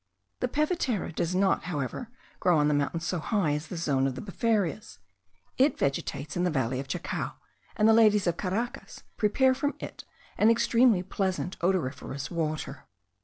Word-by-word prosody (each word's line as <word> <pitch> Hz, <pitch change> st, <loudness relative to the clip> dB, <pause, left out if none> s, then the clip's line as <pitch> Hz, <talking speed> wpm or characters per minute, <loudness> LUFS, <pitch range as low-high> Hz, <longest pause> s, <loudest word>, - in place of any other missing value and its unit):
The 250 Hz, -, 0 dB
pevetera 290 Hz, -, 0 dB
does 170 Hz, +3 st, -1 dB
not, 190 Hz, +1 st, +2 dB
however, 160 Hz, -, -4 dB, 0.3 s
grow 175 Hz, -3 st, +3 dB
on 150 Hz, 0 st, +3 dB
the -, -, +2 dB
mountains 145 Hz, +3 st, -1 dB
so 180 Hz, +1 st, -1 dB
high 190 Hz, -2 st, 0 dB
as 150 Hz, +2 st, -2 dB
the 180 Hz, -, -6 dB
zone 135 Hz, -5 st, +1 dB
of 130 Hz, -, -3 dB
the 130 Hz, -, -6 dB
befarias; 210 Hz, 0 st, -1 dB, 0.6 s
it 270 Hz, +1 st, +4 dB
vegetates 140 Hz, +1 st, -2 dB
in 175 Hz, -, 0 dB
the 180 Hz, -, +2 dB
valley 130 Hz, -4 st, -1 dB
of 135 Hz, -, -5 dB
Chacao, 170 Hz, +6 st, -3 dB, 0.4 s
and 215 Hz, -1 st, +4 dB
the 225 Hz, -, +7 dB
ladies 215 Hz, -3 st, +5 dB
of 175 Hz, -2 st, +1 dB
Caracas 205 Hz, +7 st, -4 dB
prepare 260 Hz, +5 st, +3 dB
from 285 Hz, +3 st, -1 dB
it -, -, -8 dB, 0.4 s
an 215 Hz, -, +6 dB
extremely 230 Hz, -3 st, +4 dB
pleasant 190 Hz, -1 st, -2 dB
odoriferous 150 Hz, -5 st, -2 dB
water. 155 Hz, -4 st, -3 dB
180 Hz, 170 wpm, -28 LUFS, 150-220 Hz, 0.6 s, the